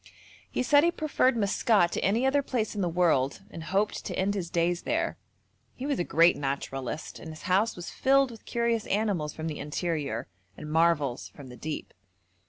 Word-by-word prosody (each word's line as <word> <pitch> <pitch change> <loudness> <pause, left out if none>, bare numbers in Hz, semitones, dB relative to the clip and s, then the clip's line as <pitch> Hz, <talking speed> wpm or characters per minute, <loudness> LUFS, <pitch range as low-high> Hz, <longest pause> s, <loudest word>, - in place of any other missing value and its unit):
He - - -1
said 290 +3 +5
he 340 - +5
preferred 295 -7 +1
Maskat 200 -3 +3
to - - -2
any 225 +6 +2
other 280 +2 +3
place 245 -5 -2
in 205 - -3
the 180 - +1
world, 165 -5 +2
and 165 -1 -8
hoped 195 +4 0
to - - -4
end 195 +2 +1
his 185 -4 -3
days 170 +1 +1
there; - - -1 0.6
he 260 - -6
was 285 -2 0
a - - +2
great 170 +1 +5
naturalist, 135 0 -4
and 160 - -9
his 155 0 -10
house 195 +5 +2
was 175 -1 -7
filled 270 -1 +3
with 225 - -13
curious 235 -2 0
animals 195 -8 0
from 160 - -5
the 155 -2 -4
interior, 150 -5 -2 0.3
and 150 - -7
marvels 160 -6 +2
from 140 -3 -11
the 125 - -10
deep. 155 +3 -6
175 Hz, 190 wpm, -28 LUFS, 155-230 Hz, 0.6 s, said